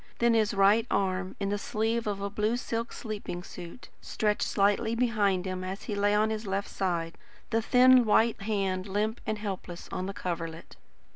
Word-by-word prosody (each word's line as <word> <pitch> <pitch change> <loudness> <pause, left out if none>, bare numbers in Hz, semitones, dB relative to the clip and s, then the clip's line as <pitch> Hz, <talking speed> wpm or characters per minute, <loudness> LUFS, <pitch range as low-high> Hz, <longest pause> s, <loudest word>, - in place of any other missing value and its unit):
Then 235 0 +3
his 215 -2 +2
right 205 +4 +4
arm 185 -1 -1
in 200 -1 -1
the 205 0 -1
sleeve 225 +2 -1
of 200 -1 -2
a 200 - -2
blue 215 +3 0
silk 230 -1 -3
sleeping 205 -5 -6
suit, 180 +8 -10
stretched 210 -1 -1
slightly 205 +3 +2
behind 210 -6 +1
him 185 0 -3
as 190 +2 -5
he 210 - -4
lay 205 0 +2
on 215 +1 +2
his 215 -1 -4
left 195 +1 -2
side, 170 -3 -2 0.3
the 225 0 +2
thin 255 +2 +6
white 225 0 +3
hand 195 -2 -1
limp 210 +3 -1
and 215 - -1
helpless 190 -4 -6
on 185 - -3
the 195 - -4
coverlet. 165 -2 -5
205 Hz, 185 wpm, -29 LUFS, 190-220 Hz, 0.3 s, thin